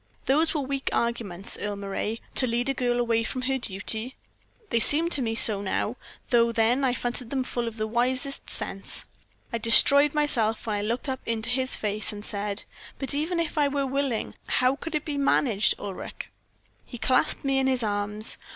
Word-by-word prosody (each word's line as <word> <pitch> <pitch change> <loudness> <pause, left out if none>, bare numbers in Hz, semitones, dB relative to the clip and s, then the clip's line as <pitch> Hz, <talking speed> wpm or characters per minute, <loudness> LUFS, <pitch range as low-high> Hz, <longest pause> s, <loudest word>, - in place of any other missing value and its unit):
"Those 310 +5 +2
were 300 - +1
weak 275 0 -2
arguments, 215 -6 -1
Earle 205 0 -3
Moray, 200 +3 -4
to 255 - +1
lead 240 +3 -1
a - - +2
girl 245 -2 0
away 230 -1 +1
from 255 +3 -4
her 265 +1 0
duty. 220 +3 -2 0.6
They 230 - +3
seem 320 +8 +3
to 285 - +4
me 225 -2 -1
so 215 -3 +3
now, 205 +3 -1 0.4
though 235 -1 +4
then 235 +4 +2
I 250 -2 +2
fancied 245 -1 -3
them 265 -1 -1
full 240 -2 -3
of 230 0 -6
wisest 250 +5 0
sense. 195 0 -4 0.5
I 230 - 0
destroyed 280 +6 +6
myself 235 -7 +2
when 215 -2 -1
I - - -2
looked 235 +6 -2
up 260 -1 -2
into 230 +1 0
his 260 0 +2
face, 210 0 -1
and 210 0 -8
said; 205 0 -2 0.3
"'But 270 - +3
even 320 +5 -1
if 325 -1 -1
I 290 - +4
were 280 0 -1
willing, 270 -3 -2
how 255 +1 +2
could 325 +2 -6
it 300 - -2
be 290 -2 -3
managed, 235 -6 +3
Ulric?' 200 -2 -7 0.5
"He 245 - -9
clasped 255 +3 +1
me 270 0 +2
in 265 - +1
his 255 -2 +1
arms. 210 +1 -1
240 Hz, 190 wpm, -26 LUFS, 220-275 Hz, 0.6 s, destroyed